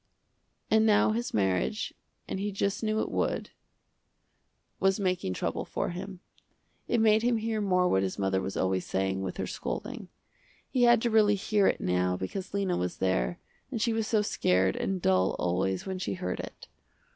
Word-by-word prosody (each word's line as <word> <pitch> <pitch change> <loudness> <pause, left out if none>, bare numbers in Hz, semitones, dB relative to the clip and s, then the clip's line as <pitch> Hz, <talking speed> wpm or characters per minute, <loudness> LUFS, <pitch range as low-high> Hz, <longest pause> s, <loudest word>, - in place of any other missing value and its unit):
And 220 0 +5
now 210 0 +4
his 235 +2 -2
marriage, 95 -3 0 0.3
and - - -3
he 205 +1 -2
just 200 +2 -1
knew 215 0 +1
it - - -3
would, - - -1 1.3
was 195 +1 +2
making 180 - -1
trouble - - -2
for - - -3
him. 185 +1 -7 0.7
It 240 - +1
made 220 0 +5
him 240 0 +2
hear 220 -1 -1
more 180 -2 +2
what 95 - +2
his 95 -1 -2
mother 95 -1 0
was 95 - -4
always 95 -1 +1
saying, 95 0 -1
with 95 -1 -4
her - - -2
scolding. - - -5 0.6
He 255 - 0
had 240 -1 +5
to 235 - +1
really 210 -2 +5
hear 200 0 +2
it - - +1
now 90 0 +1
because 185 - -5
Lena 195 -3 0
was 90 0 -2
there, 95 -11 0 0.3
and 250 -4 -3
she 230 +1 +1
was 225 -1 -1
so 215 -2 +2
scared 95 - +2
and 190 -2 -2
dull 95 0 +3
always 90 +1 -1
when 190 -1 -4
she 100 - -2
heard 90 0 -3
it. - - -8
185 Hz, 180 wpm, -29 LUFS, -, 1.3 s, And